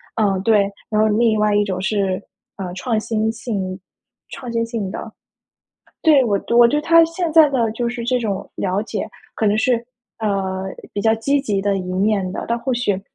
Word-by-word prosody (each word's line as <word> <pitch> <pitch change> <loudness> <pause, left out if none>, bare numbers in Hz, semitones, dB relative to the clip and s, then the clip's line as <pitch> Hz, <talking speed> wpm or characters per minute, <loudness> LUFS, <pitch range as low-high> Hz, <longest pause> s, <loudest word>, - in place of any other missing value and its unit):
呃， 200 -4 +1
对， 205 -1 +3 0.2
然 215 0 +2
后 215 - +4
另 220 0 +2
外 210 -1 +2
一 205 - +4
种 185 -2 -3
是， 195 -1 0 0.4
呃， 190 -3 -5
创 220 +3 -1
新 220 0 -1
性 200 -5 -4 0.5
创 245 -2 -7
新 230 0 +1
性 230 -4 -4
的。 225 +2 -7 0.9
对， 290 -5 +5
我 200 -4 +1 0.2
我 240 - +9
对 295 +5 +1
它 330 +2 +6
现 330 +1 -2
在 315 -2 +7
的 235 -5 +1
就 235 +1 -2
是 240 0 -4
这 250 +1 +1
种 205 -5 -3
了 190 +1 -1
解 220 0 -4 0.3
可 220 - 0
能 205 +1 +3
是， 240 +3 +3 0.4
呃， 195 -3 -1 0.3
比 205 - -2
较 220 +1 +3
积 280 +6 +1
极 205 -8 -1
的 200 -1 +1
一 185 -1 -4
面 195 0 +1
的。 - - -4
但 235 - 0
或 255 +1 -1
许 205 -6 0
215 Hz, 210 characters per minute, -20 LUFS, 195-240 Hz, 0.9 s, 我